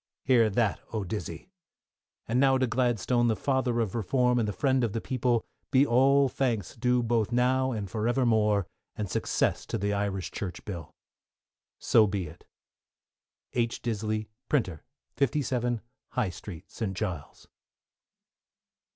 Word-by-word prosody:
Hear 120 Hz, -4 st, +4 dB
that, 105 Hz, -1 st, +1 dB
oh, 110 Hz, -3 st, -2 dB
Dizzey. 105 Hz, -, -6 dB, 0.8 s
And 120 Hz, +3 st, +1 dB
now 135 Hz, -1 st, +5 dB
to 130 Hz, -, +2 dB
Gladstone, 120 Hz, 0 st, +1 dB
the 110 Hz, -, +2 dB
father 130 Hz, -1 st, 0 dB
of 110 Hz, -5 st, -2 dB
Reform, 125 Hz, +3 st, +2 dB
and 110 Hz, -, +1 dB
the -, -, 0 dB
friend 130 Hz, +4 st, +1 dB
of 110 Hz, -4 st, 0 dB
the 115 Hz, -, -1 dB
people, 125 Hz, -2 st, 0 dB, 0.2 s
be 135 Hz, 0 st, +5 dB
all 135 Hz, +2 st, +4 dB
thanks 120 Hz, -8 st, -1 dB
due 125 Hz, +1 st, +2 dB
both 115 Hz, -1 st, +1 dB
now 130 Hz, +2 st, +2 dB
and 105 Hz, -4 st, -3 dB
for 110 Hz, +4 st, -2 dB
evermore, 110 Hz, -5 st, +2 dB, 0.3 s
and 105 Hz, -, -3 dB
success 90 Hz, -, 0 dB
to -, -, -2 dB
the 100 Hz, +1 st, -1 dB
Irish 100 Hz, -3 st, -2 dB
Church 90 Hz, -3 st, -5 dB
Bill. 90 Hz, -5 st, -7 dB, 0.8 s
So 110 Hz, -3 st, +4 dB
be 100 Hz, -2 st, -2 dB
it. 80 Hz, +2 st, -13 dB, 1.1 s
H. 115 Hz, -1 st, 0 dB
Disley, 110 Hz, -2 st, -2 dB, 0.2 s
Printer, 95 Hz, -, 0 dB, 0.3 s
57, 125 Hz, -4 st, 0 dB, 0.3 s
High 105 Hz, -, +1 dB
Street, 90 Hz, 0 st, -10 dB
St. 95 Hz, -5 st, -4 dB
Giles. 90 Hz, -9 st, -5 dB
115 Hz, 140 wpm, -28 LUFS, 105-125 Hz, 1.1 s, now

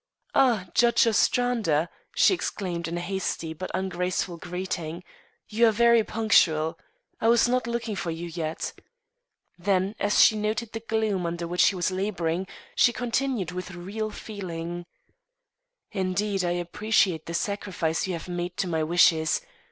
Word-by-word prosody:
"Ah, 240 Hz, -8 st, +3 dB
Judge 240 Hz, 0 st, +4 dB
Ostrander," 225 Hz, -8 st, +2 dB, 0.3 s
she -, -, +5 dB
exclaimed 180 Hz, -, -3 dB
in 170 Hz, +1 st, -3 dB
a -, -, -3 dB
hasty 175 Hz, -3 st, -3 dB
but 185 Hz, +4 st, -6 dB
not -, -, -1 dB
ungraceful 180 Hz, -1 st, -2 dB
greeting, 175 Hz, -1 st, -4 dB, 0.4 s
"you 230 Hz, +2 st, +3 dB
are -, -, +5 dB
very 235 Hz, +1 st, +5 dB
punctual. 165 Hz, -8 st, +2 dB, 0.4 s
I 225 Hz, -, +1 dB
was 235 Hz, +1 st, +5 dB
not 250 Hz, -1 st, 0 dB
looking 235 Hz, -2 st, -2 dB
for 175 Hz, -, -3 dB
you 165 Hz, +1 st, -4 dB
yet." 160 Hz, -1 st, -4 dB, 0.9 s
Then, 190 Hz, +1 st, +1 dB
as 205 Hz, 0 st, +2 dB
she 220 Hz, -, +6 dB
noted 215 Hz, +2 st, -2 dB
the 225 Hz, -, -4 dB
gloom 220 Hz, -5 st, -1 dB
under 170 Hz, 0 st, -3 dB
which 175 Hz, +1 st, +3 dB
he 200 Hz, -, +1 dB
was 180 Hz, 0 st, 0 dB
labouring, 185 Hz, -2 st, -1 dB, 0.3 s
she 245 Hz, -, +4 dB
continued 245 Hz, -5 st, -1 dB
with 180 Hz, 0 st, -6 dB
real 205 Hz, +5 st, -4 dB
feeling, 175 Hz, -5 st, -6 dB, 1.0 s
"Indeed, 195 Hz, 0 st, -1 dB
I 175 Hz, 0 st, +1 dB
appreciate 175 Hz, -1 st, +1 dB
this 170 Hz, 0 st, -1 dB
sacrifice 190 Hz, -5 st, -2 dB
you 185 Hz, -, -2 dB
have 165 Hz, 0 st, -6 dB
made 175 Hz, 0 st, -4 dB
to 190 Hz, -, 0 dB
my 160 Hz, -2 st, 0 dB
wishes. 160 Hz, -1 st, +3 dB
185 Hz, 150 wpm, -26 LUFS, 170-220 Hz, 1.0 s, she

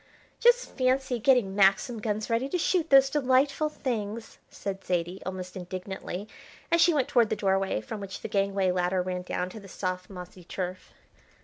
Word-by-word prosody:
"Just 485 Hz, +1 st, +4 dB
fancy 255 Hz, -1 st, +1 dB
getting 240 Hz, -5 st, +3 dB
Maxim 200 Hz, +4 st, +3 dB
guns 210 Hz, 0 st, -2 dB
ready 235 Hz, +3 st, 0 dB
to 360 Hz, -, 0 dB
shoot 340 Hz, -1 st, +1 dB
those 270 Hz, -1 st, +7 dB
delightful 275 Hz, +2 st, +2 dB
things," 225 Hz, -6 st, -4 dB
said 195 Hz, -1 st, -6 dB
Zaidie, 175 Hz, +1 st, -2 dB
almost 185 Hz, -1 st, -6 dB
indignantly, 185 Hz, +1 st, -6 dB, 0.4 s
as 335 Hz, 0 st, +4 dB
she 345 Hz, -, +6 dB
went 285 Hz, -5 st, +1 dB
towards 235 Hz, -4 st, +3 dB
the -, -, 0 dB
doorway 195 Hz, -, 0 dB
from 110 Hz, -, -6 dB
which 195 Hz, -1 st, -7 dB
the -, -, -4 dB
gangway 195 Hz, -2 st, +1 dB
ladder 180 Hz, 0 st, 0 dB
ran 180 Hz, 0 st, -3 dB
down 180 Hz, 0 st, -3 dB
to 220 Hz, -, -9 dB
the 200 Hz, -, -12 dB
soft, 185 Hz, -1 st, -4 dB
mossy 180 Hz, -1 st, -10 dB
turf. 185 Hz, +1 st, -5 dB
200 Hz, 175 wpm, -28 LUFS, 185-255 Hz, 0.4 s, those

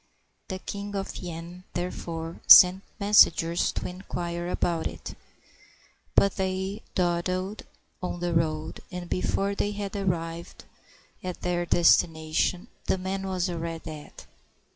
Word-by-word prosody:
The 190 Hz, -1 st, -5 dB
ELing 205 Hz, 0 st, -5 dB
of 195 Hz, -1 st, -4 dB
Yen, 175 Hz, +1 st, -8 dB
therefore, 170 Hz, -2 st, -4 dB
sent 185 Hz, +1 st, +10 dB, 0.2 s
messengers 175 Hz, -5 st, +4 dB
to -, -, -3 dB
inquire 175 Hz, -1 st, -5 dB
about 170 Hz, -2 st, 0 dB
it; -, -, -8 dB, 1.0 s
but 200 Hz, -1 st, +4 dB
they 190 Hz, +2 st, -2 dB
dawdled 185 Hz, +3 st, -1 dB, 0.3 s
on 180 Hz, -1 st, -4 dB
the 175 Hz, 0 st, -1 dB
road, 155 Hz, -1 st, -1 dB
and 180 Hz, -1 st, -6 dB
before 195 Hz, +3 st, 0 dB
they 205 Hz, +1 st, -1 dB
had 205 Hz, -1 st, -5 dB
arrived 170 Hz, -3 st, -3 dB, 0.6 s
at 180 Hz, -1 st, -5 dB
their 175 Hz, -1 st, -1 dB
destination, 165 Hz, 0 st, +2 dB, 0.2 s
the -, -, +2 dB
man 190 Hz, +1 st, -3 dB
was 185 Hz, -1 st, -1 dB
already 165 Hz, -2 st, -4 dB
dead. 155 Hz, -2 st, -9 dB
180 Hz, 120 wpm, -27 LUFS, 170-190 Hz, 1.0 s, sent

